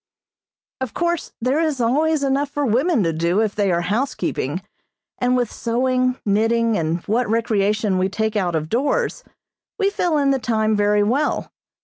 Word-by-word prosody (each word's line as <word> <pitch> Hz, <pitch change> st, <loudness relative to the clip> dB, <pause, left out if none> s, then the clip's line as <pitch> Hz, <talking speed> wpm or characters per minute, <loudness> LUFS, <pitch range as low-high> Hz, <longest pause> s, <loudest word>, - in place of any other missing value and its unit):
Of 260 Hz, -3 st, -5 dB
course 345 Hz, -2 st, -1 dB
there 255 Hz, +5 st, +1 dB
is 310 Hz, -5 st, 0 dB
always 290 Hz, +6 st, +1 dB
enough 275 Hz, +1 st, +1 dB
for 290 Hz, 0 st, -2 dB
women 260 Hz, -, +2 dB
to 165 Hz, -1 st, 0 dB
do 170 Hz, +5 st, +1 dB
if 215 Hz, -2 st, +1 dB
they 200 Hz, -3 st, +1 dB
are 170 Hz, 0 st, +1 dB
housekeeping, 220 Hz, +10 st, -2 dB, 0.6 s
and 250 Hz, 0 st, +2 dB
with 245 Hz, -3 st, -1 dB
sewing, 255 Hz, +2 st, 0 dB
knitting 225 Hz, +2 st, +2 dB
and 165 Hz, -1 st, -1 dB
what 230 Hz, +2 st, 0 dB
recreation 215 Hz, -3 st, +1 dB
we 185 Hz, +1 st, +1 dB
take 220 Hz, +2 st, -2 dB
out 180 Hz, -5 st, 0 dB
of 155 Hz, -1 st, -1 dB
doors, 290 Hz, -, 0 dB, 0.5 s
we 400 Hz, -2 st, +1 dB
fill 345 Hz, -5 st, 0 dB
in 280 Hz, -1 st, +2 dB
the 270 Hz, -, +1 dB
time 220 Hz, -3 st, +1 dB
very 205 Hz, 0 st, +3 dB
well. 265 Hz, +8 st, 0 dB
230 Hz, 165 wpm, -21 LUFS, 205-275 Hz, 0.6 s, very